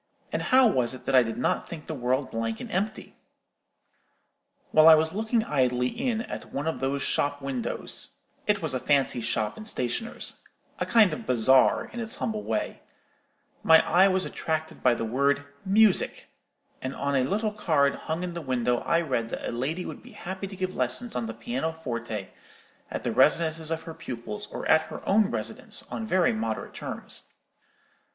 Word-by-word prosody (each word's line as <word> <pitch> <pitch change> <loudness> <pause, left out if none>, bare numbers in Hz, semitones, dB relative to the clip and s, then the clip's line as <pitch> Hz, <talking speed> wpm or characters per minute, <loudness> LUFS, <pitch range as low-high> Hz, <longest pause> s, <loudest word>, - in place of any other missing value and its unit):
and - - 0
how 260 0 +5
was 130 - +2
it 130 - -13
that 135 - -1
I 130 - +8
did 115 -1 -3
not 125 - 0
think 160 -3 -8
the - - -5
world 130 0 -1
blank 115 0 -2
and - - -7
empty? 200 +4 -3 1.5
"While 155 +1 +7
I 160 - +11
was 160 +2 +1
looking 220 +2 0
idly 125 - +1
in 240 - -1
at - - -7
one 140 +2 -3
of 160 - -2
those 135 +1 -1
shop 145 0 0
windows—it 140 - -4
was 155 -4 +1
a 130 - 0
fancy 135 -3 +1
shop 110 -1 -1
and 215 - -7
stationer's—a 130 - -4
kind 215 -7 +5
of - - -7
bazaar, 130 +2 +4
in 240 - -5
its 225 -1 +1
humble 215 -1 -2
way—my 160 -5 -1
eye 190 +2 +6
was 190 -1 +1
attracted 160 0 -3
by 125 -2 +4
the 115 - -3
word 140 +5 +1 0.2
'Music;' 205 0 +3 0.5
and 130 +1 -4
on 140 0 -1
a 130 - +3
little 210 - -1
card 155 -9 +2
hung 160 +2 -4
in 180 -1 -4
the 170 - -5
window 125 -3 0
I 170 0 +1
read 125 -8 -1
that - - -4
a - - -2
lady 145 +10 -2
would - - -7
be - - -14
happy 190 +2 -6
to 195 - -9
give 185 0 -3
lessons 130 - 0
on 120 -2 -2
the 115 - -5
piano 125 +7 -2
forte, 115 -9 -5 0.6
at - - -5
the - - -1
residences 160 -1 +3
of 160 0 -2
her 165 - -7
pupils, 130 - -6
or - - -5
at 160 0 +3
her - - -9
own 205 0 +4
residence, - - -2
on 225 - -4
very 185 - +3
moderate 110 0 -3
terms. - - -4
155 Hz, 180 wpm, -27 LUFS, 125-190 Hz, 1.5 s, I